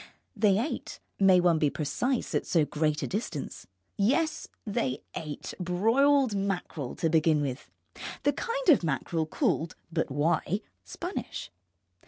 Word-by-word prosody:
They 205 -3 +4
ate 250 +9 -3 0.2
(may 190 -2 +6
one 175 -2 +3
be 150 - +3
precise 235 - -1
at - - 0
so 165 -4 +3
great 150 0 0
a - - -1
distance?) 195 - -4 0.3
yes, 280 +10 +1 0.2
they 135 - -1
ate 150 -2 -5
broiled 225 +8 +3
mackerel 190 -8 -2
to 165 - 0
begin 160 -1 +3
with; 140 -2 -3 0.5
the 290 - +3
kind 475 - -1
of 280 - +6
mackerel 160 +1 -1
called 160 +1 0 0.2
(but 160 -2 0
why?) 160 +7 +1 0.2
Spanish. 355 +3 -5
180 Hz, 135 wpm, -29 LUFS, 155-225 Hz, 0.5 s, may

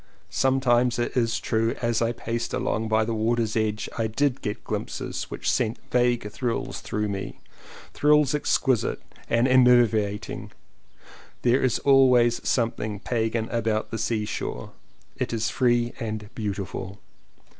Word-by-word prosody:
Sometimes 125 -2 +2
it 120 - -2
is 115 -3 +1
true 115 +1 0
as 120 -2 0
I 115 0 +2
paced 115 0 -3
along 110 +1 -1
by 110 0 +2
the 115 - -2
water's 110 0 0
edge 110 -1 -1
I 115 - +1
did 135 +4 0
get 105 - -4
glimpses - - -4
which - - -6
sent 110 - +1
vague 120 -4 +1
thrills 120 +1 -3
through 105 0 -2
me 100 -1 -5 0.3
— - - -18
thrills 150 -1 +4
exquisite 135 -4 +1 0.3
and 115 +2 +3
enervating. 120 -5 +3 0.9
There 125 +2 +3
is 130 -3 +2
always 125 -4 +4
something 110 -4 -1
Pagan 115 0 -1
about 110 -2 -1
the 115 - -3
seashore: 105 -2 -3 0.5
it - - -2
is 110 -1 -1
free 120 -2 +2
and 110 -3 -5
beautiful. 100 -2 -4
115 Hz, 135 wpm, -25 LUFS, 110-125 Hz, 0.9 s, thrills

